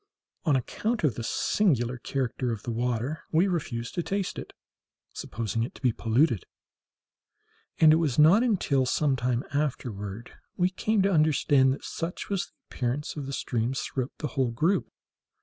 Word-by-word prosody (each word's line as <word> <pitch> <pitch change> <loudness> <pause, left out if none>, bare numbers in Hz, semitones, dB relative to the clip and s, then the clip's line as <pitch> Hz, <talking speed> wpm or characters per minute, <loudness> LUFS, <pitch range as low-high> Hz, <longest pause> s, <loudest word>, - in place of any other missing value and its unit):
On 150 -4 +4
account 215 - -1
of 145 -6 +3
the 115 - -5
singular 125 - +1
character 125 -1 -2
of 110 -3 -5
the 120 - -3
water, 125 +5 -1
we 170 +5 +4
refused 130 -10 -3
to 175 - -1
taste 195 +2 -2
it, - - -8 0.6
supposing 115 0 -3
it 115 - -3
to - - -14
be 125 - +4
polluted; 115 - +2 1.4
and 155 -1 +8
it - - +5
was 155 -7 0
not 160 +8 +7
until 165 - +2
some 140 +1 +2
time 125 0 0
afterward 115 -7 -3 0.3
we 180 0 +2
came 215 +1 +1
to 195 0 +2
understand 145 -4 +4
that 135 - -4
such 170 +2 -5
was 195 -3 -1
the - - -31 0.2
appearance 130 +4 -2
of 145 -3 -5
the 140 - -5
streams 125 +3 -1
throughout 130 -4 -3
the 150 - -3
whole 130 -3 0
group. 160 +12 +1
135 Hz, 165 wpm, -27 LUFS, 120-165 Hz, 1.4 s, and